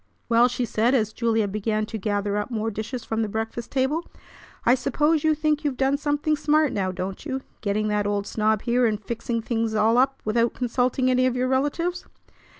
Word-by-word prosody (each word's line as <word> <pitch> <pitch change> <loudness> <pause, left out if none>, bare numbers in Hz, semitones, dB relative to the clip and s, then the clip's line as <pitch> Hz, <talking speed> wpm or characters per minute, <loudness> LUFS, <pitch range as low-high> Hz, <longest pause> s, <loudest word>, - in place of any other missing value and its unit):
"Well!" 235 +1 +5
she 245 0 -2
said 230 +3 +2
as 215 -4 +1
Julia 225 -3 +1
began 215 +2 -1
to 220 +1 -5
gather 205 0 -1
up 210 +2 -2
more 225 -2 -2
dishes 220 +4 -5
from 225 0 -1
the 220 - -1
breakfast 225 +2 -4
table. 275 +5 0 0.6
"I 240 - +6
suppose 295 +4 +1
you 315 -1 +3
think 305 0 0
you've 285 -4 -1
done 270 +1 +2
something 295 +1 0
smart 300 0 +2
now, 190 -2 -1
don't 185 +1 -5
you, 265 -3 -3 0.2
getting 215 +1 0
that 210 -1 0
old 205 -1 -1
snob 215 0 0
here 245 0 +2
and 210 -2 -1
fixing 230 +1 -3
things 225 -1 -1
all 220 +3 +4
up 265 +1 +2
without 230 +2 +1
consulting 255 +1 +1
any 255 0 +3
of 255 - -1
your 255 0 0
relatives?" 295 +7 -1
235 Hz, 200 wpm, -24 LUFS, 215-265 Hz, 0.6 s, I